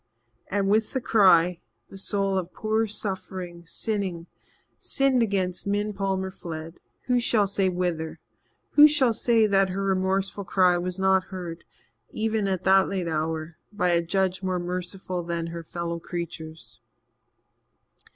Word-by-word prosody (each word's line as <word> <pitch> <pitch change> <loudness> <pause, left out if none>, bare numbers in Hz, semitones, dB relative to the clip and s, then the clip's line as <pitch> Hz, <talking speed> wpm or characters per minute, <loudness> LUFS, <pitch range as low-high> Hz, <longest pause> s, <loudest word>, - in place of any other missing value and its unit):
And 200 0 0
with 215 +2 +2
the 260 - 0
cry, 180 -7 +4 0.3
the 195 - -11
soul 195 0 -1
of 185 -2 -2
poor 220 +1 0
suffering, 185 -4 -4
sinning, 190 -5 -3 0.5
sinned 270 -2 +2
against 190 -4 -1
Min 205 +1 0
Palmer 190 -1 -2
fled 165 -2 -8 0.2
who 250 0 +2
shall 230 -3 +2
say 195 -1 +1
whither? 175 -3 -2 0.5
Who 295 0 +9
shall 275 -6 +3
say 225 0 +3
that 195 -2 +3
her 195 +2 -2
remorseful 195 +1 0
cry 180 -1 +3
was 180 +1 -3
not 190 -1 +3
heard, 175 -3 -7 0.4
even 220 -2 -1
at 190 -2 -1
that 190 0 +5
late 185 -3 -2
hour, 160 0 -3
by 205 -4 0
a 170 -1 +3
Judge 185 +2 0
more 185 -1 -1
merciful 180 +1 -4
than 170 -1 -3
her 170 - -5
fellow 170 +1 -4
creatures? 165 -2 -7
190 Hz, 140 wpm, -26 LUFS, 175-200 Hz, 0.5 s, Who